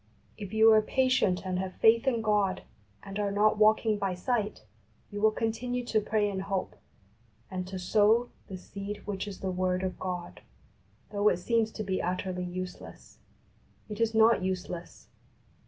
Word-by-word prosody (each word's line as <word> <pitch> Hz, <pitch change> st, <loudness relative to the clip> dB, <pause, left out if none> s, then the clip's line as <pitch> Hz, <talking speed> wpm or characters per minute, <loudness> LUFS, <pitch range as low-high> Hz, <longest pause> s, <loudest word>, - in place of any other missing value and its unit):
If 200 Hz, -3 st, -8 dB
you 220 Hz, +1 st, +6 dB
are 215 Hz, 0 st, +6 dB
patient 215 Hz, -7 st, +1 dB
and 185 Hz, -1 st, -1 dB
have 190 Hz, 0 st, -4 dB
faith 230 Hz, +3 st, +4 dB
in 235 Hz, -4 st, +1 dB
God, 205 Hz, -3 st, +1 dB, 0.4 s
and 195 Hz, +1 st, -6 dB
are 205 Hz, -1 st, 0 dB
not 210 Hz, +2 st, +2 dB
walking 215 Hz, 0 st, +4 dB
by 195 Hz, -2 st, -1 dB
sight, 210 Hz, -, -2 dB, 0.5 s
you 205 Hz, 0 st, -5 dB
will 220 Hz, -, +6 dB
continue 235 Hz, +3 st, -2 dB
to 220 Hz, -2 st, +1 dB
pray 210 Hz, 0 st, +1 dB
in 195 Hz, -2 st, -3 dB
hope, 190 Hz, -, -3 dB, 0.8 s
and 185 Hz, -1 st, -4 dB
to 190 Hz, 0 st, -6 dB
sow 215 Hz, +6 st, +3 dB, 0.2 s
''the 190 Hz, -, -6 dB
seed 200 Hz, +2 st, -7 dB
which 205 Hz, -1 st, -4 dB
is 195 Hz, -2 st, -8 dB
the 190 Hz, -, -2 dB
word 185 Hz, 0 st, 0 dB
of 185 Hz, -1 st, -3 dB
God," 180 Hz, -2 st, -5 dB, 0.7 s
though 205 Hz, 0 st, +3 dB
it -, -, 0 dB
seems 225 Hz, +4 st, +1 dB
to 215 Hz, -, -4 dB
be 190 Hz, -2 st, -1 dB
utterly 180 Hz, 0 st, -2 dB
useless. 180 Hz, 0 st, -8 dB, 0.7 s
It 210 Hz, +1 st, -5 dB
is 225 Hz, -1 st, +1 dB
not 225 Hz, -1 st, +5 dB
useless. 180 Hz, -2 st, -5 dB
205 Hz, 170 wpm, -29 LUFS, 185-220 Hz, 0.8 s, you